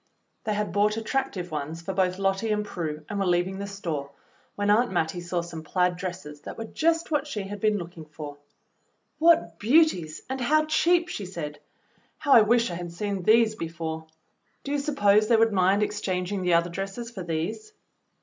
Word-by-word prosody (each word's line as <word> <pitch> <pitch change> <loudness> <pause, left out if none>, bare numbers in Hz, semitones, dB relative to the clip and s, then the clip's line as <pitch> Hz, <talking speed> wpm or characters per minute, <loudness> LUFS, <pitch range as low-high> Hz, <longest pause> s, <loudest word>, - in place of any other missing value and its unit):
They 215 -1 0
had 210 0 -1
bought 210 +1 +2
attractive 220 -6 -2
ones 155 +2 -4
for 190 - -3
both 185 -1 +1
Lottie 195 +3 0
and 210 0 0
Prue, 155 -6 -5
and 205 - -3
were 195 - +1
leaving 180 +2 +1
the 200 - -4
store, 165 -8 -4 0.5
when 205 0 +1
Aunt 235 +2 +3
Mattie 175 -1 -1
saw 175 0 -2
some 170 -1 -7
plaid 180 +3 +1
dresses 175 -5 -6
that - - -8
were 225 - -4
just 330 +7 0
what 295 -1 +1
she 215 -8 -4
had 200 +1 -6
been 215 -1 +3
looking 170 -3 -8
for. 150 -1 -9 0.8
"What 310 - +4
beauties, 210 - +3
and 265 0 -4
how 310 +5 +3
cheap!" 340 +2 +3
she 205 - -5
said. 150 -5 -6 0.6
"How 300 -2 -2
I 230 - +9
wish 230 0 +3
I - - -4
had 175 -1 -6
seen 200 +2 -3
these 220 +3 +4
before! 160 -4 -5 0.6
Do 280 - -5
you 290 - +1
suppose 215 -8 +3
they 230 0 +5
would 225 -1 +3
mind 195 +2 +3
exchanging 190 -2 -2
the 180 -2 +3
other 170 +1 +2
dresses 195 +6 -5
for 195 - -7
these.?" 175 - -3
195 Hz, 190 wpm, -26 LUFS, 170-225 Hz, 0.8 s, I